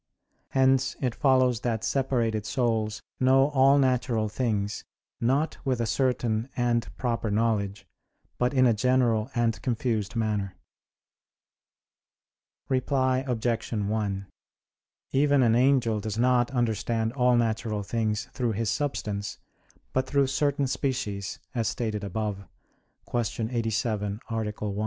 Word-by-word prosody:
Hence 135 0 +2
it 125 -3 -1
follows 130 -4 +3
that 115 -2 -2
separated 120 -6 0
souls 110 -3 -1 0.2
know 135 +2 +4
all 135 0 +5
natural 125 -5 +1
things 105 -3 -2 0.4
not 135 +7 0
with 130 -3 0
a 115 - +1
certain 120 -1 0
and 120 -1 +1
proper 115 -3 -1
knowledge, 105 -2 0 0.5
but 125 0 +2
in 130 -2 +4
a 120 - +5
general 120 -1 +2
and 115 -3 +1
confused 115 -4 -1
manner. 105 -4 -1 2.1
Reply 130 0 +1
Obj. 120 -1 -1
1: 105 -2 -1 0.9
Even 140 0 +3
an 115 -2 +4
angel 125 -3 +3
does 110 +1 -4
not 125 0 +3
understand 115 -2 0
all 125 -2 +3
natural 110 -2 -1
things 105 -1 -1
through 120 -3 -1
his 110 0 -1
substance, 105 -8 -3 0.6
but 130 0 0
through 140 -1 +3
certain 140 +1 +1
species, 105 -7 -2 0.2
as 115 -3 0
stated 110 -2 -2
above 100 -1 -3 0.6
(Q. 115 -1 -2
87, 110 -3 -1
A. 115 0 0
1). 105 -1 -4
115 Hz, 120 wpm, -27 LUFS, 110-130 Hz, 2.1 s, all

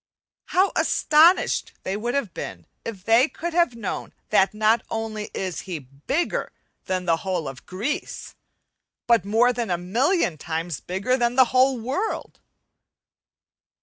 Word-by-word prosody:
How 375 +2 +2
astonished 320 +5 +4
they 190 - -2
would 240 +5 -2
have 230 -11 -1
been 85 -3 -7 0.2
if 200 -5 -7
they 230 +7 +4
could 345 +1 -5
have 340 -8 +2
known 220 -4 -5 0.2
that 190 - +4
not 215 +2 +2
only 220 -1 -4
is 185 -3 -3
he 175 - -2
bigger 145 - -3 0.3
than 185 -1 -2
the 165 -1 +3
whole 180 -3 -3
of 135 0 -9
Greece, 220 - -4 0.7
but 235 -4 +3
more 230 +4 +3
than 235 -3 -3
a 175 - +1
million 210 - +1
times 165 0 -3
bigger 195 +8 -1
than 240 -1 +1
the 260 0 +7
whole 260 0 +4
world! 270 - -3
225 Hz, 145 wpm, -24 LUFS, 180-260 Hz, 0.7 s, the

